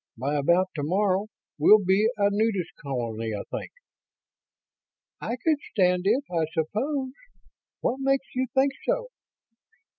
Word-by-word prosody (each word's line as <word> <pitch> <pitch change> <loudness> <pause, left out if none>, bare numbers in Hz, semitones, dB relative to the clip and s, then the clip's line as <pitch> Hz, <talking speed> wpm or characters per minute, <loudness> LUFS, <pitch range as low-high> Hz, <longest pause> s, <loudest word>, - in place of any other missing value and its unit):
By 135 +5 -2
about 170 +6 +2
tomorrow, 190 +6 0 0.3
we'll 210 -2 +6
be 195 +4 +4
a 200 -1 +3
nudist 200 -4 0
colony, 115 -5 -3
I 100 - -4
think." - - -6 1.5
"I 235 - -2
could 300 +4 +1
stand 180 -2 +2
it, 245 +7 +3
I 165 -2 +1
suppose. 260 - -1 0.7
What 260 - 0
makes 270 0 +1
you 255 0 0
think 270 +1 +4
so?" - - -1
200 Hz, 125 wpm, -26 LUFS, 160-255 Hz, 1.5 s, we'll